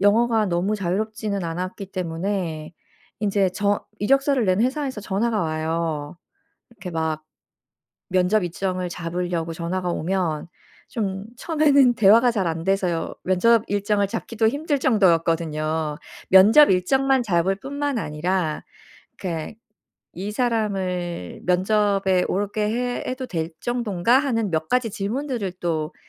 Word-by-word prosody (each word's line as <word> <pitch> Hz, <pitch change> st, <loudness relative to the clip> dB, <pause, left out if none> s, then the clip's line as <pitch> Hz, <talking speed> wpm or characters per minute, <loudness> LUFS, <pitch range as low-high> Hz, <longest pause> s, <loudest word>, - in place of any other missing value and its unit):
영어가 220 Hz, +2 st, +3 dB
너무 185 Hz, +4 st, 0 dB
자유롭지는 200 Hz, +1 st, -2 dB
않았기 180 Hz, +4 st, -4 dB
때문에 170 Hz, -2 st, -3 dB, 0.5 s
인제 200 Hz, -2 st, +1 dB
저 205 Hz, +2 st, 0 dB
이력서를 275 Hz, +2 st, +2 dB
낸 185 Hz, +2 st, +2 dB
회사에서 260 Hz, -1 st, -1 dB
전화가 210 Hz, +2 st, 0 dB
와요. 160 Hz, -1 st, -2 dB, 0.5 s
이렇게 210 Hz, -5 st, -9 dB
막 160 Hz, -1 st, -2 dB, 0.9 s
면접 185 Hz, +3 st, +2 dB
일정을 180 Hz, +1 st, -2 dB
잡으려고 170 Hz, -1 st, -3 dB
전화가 175 Hz, +2 st, -3 dB
오면 170 Hz, -3 st, -1 dB, 0.4 s
좀 195 Hz, -3 st, -3 dB
처음에는 285 Hz, -5 st, +3 dB
대화가 225 Hz, +4 st, +6 dB
잘 200 Hz, -6 st, -1 dB
안돼서요. 170 Hz, +1 st, -1 dB
면접 220 Hz, +5 st, +3 dB
일정을 205 Hz, 0 st, +1 dB
잡기도 225 Hz, +1 st, -1 dB
힘들 290 Hz, +4 st, 0 dB
정도였거든요. 165 Hz, -, +1 dB, 0.3 s
면접 215 Hz, +11 st, +8 dB
일정만 265 Hz, +8 st, +2 dB
잡을 185 Hz, -2 st, +1 dB
뿐만 285 Hz, +4 st, -3 dB
아니라 165 Hz, -1 st, -2 dB, 0.5 s
그러니까 170 Hz, +2 st, -5 dB, 0.6 s
"이 195 Hz, +4 st, -5 dB
사람을 190 Hz, -, -2 dB
면접에 195 Hz, 0 st, +2 dB
오게 205 Hz, +2 st, -1 dB
해 245 Hz, +2 st, -2 dB
해도 255 Hz, 0 st, -4 dB
될 165 Hz, -6 st, -3 dB
정도인가?"하는 235 Hz, +1 st, +1 dB
몇 160 Hz, -1 st, -1 dB
가지 250 Hz, -3 st, +1 dB
질문들을 225 Hz, 0 st, -3 dB
또 160 Hz, -2 st, -2 dB
195 Hz, 285 characters per minute, -23 LUFS, 175-225 Hz, 0.9 s, 면접